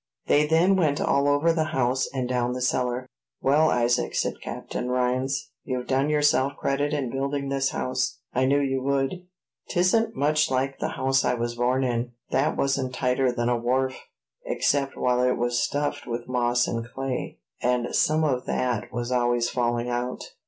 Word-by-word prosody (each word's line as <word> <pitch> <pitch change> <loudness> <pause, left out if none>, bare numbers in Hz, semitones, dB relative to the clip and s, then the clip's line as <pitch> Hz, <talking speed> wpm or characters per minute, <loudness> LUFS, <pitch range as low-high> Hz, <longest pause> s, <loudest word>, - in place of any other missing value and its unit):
They 150 +1 +3
then 170 +5 +4
went 150 -5 +2
all 140 +1 +2
over 145 +4 +3
the 160 -1 +1
house, 130 +1 +1
and 130 -2 -2
down 125 0 -1
cellar. 125 0 0 0.3
"Well, 150 +4 +3
Isaac," 120 0 +1
said - - -1
Captain 125 - -5
Rhines, 125 +2 0
"you've 125 -1 -3
done 135 +2 +1
yourself 145 -2 +3
credit 145 +2 0
in 140 -5 -2
building 140 +1 -2
this 135 0 +1
house; 130 0 -2 0.2
I 130 +1 +2
knew 140 +2 +3
you 135 -1 0
would. 140 +7 -1 0.4
'Tisn't 225 +6 +2
much 150 +1 +2
like 135 +1 -1
the - - -2
house 135 0 +2
I - - +1
was 120 0 -2
born 125 +2 +1
in; 120 -1 -1 0.2
that 135 +3 +1
wasn't 135 -2 0
tighter 125 0 +1
than 120 -1 -1
a 120 0 +2
wharf, 130 +2 0 0.5
except 140 -1 0
while 125 0 +2
it 125 0 +2
was 120 0 0
stuffed 145 +4 -2
with 120 0 -4
moss 120 -1 +1
and 115 0 -2
clay; 130 +2 -4 0.2
and 125 -1 0
some 155 +1 +3
of 130 -5 0
that 120 -4 -1
was 120 0 -3
always 120 -1 +1
falling 120 -1 0
out. 125 +1 -3
130 Hz, 175 wpm, -25 LUFS, 125-140 Hz, 0.5 s, then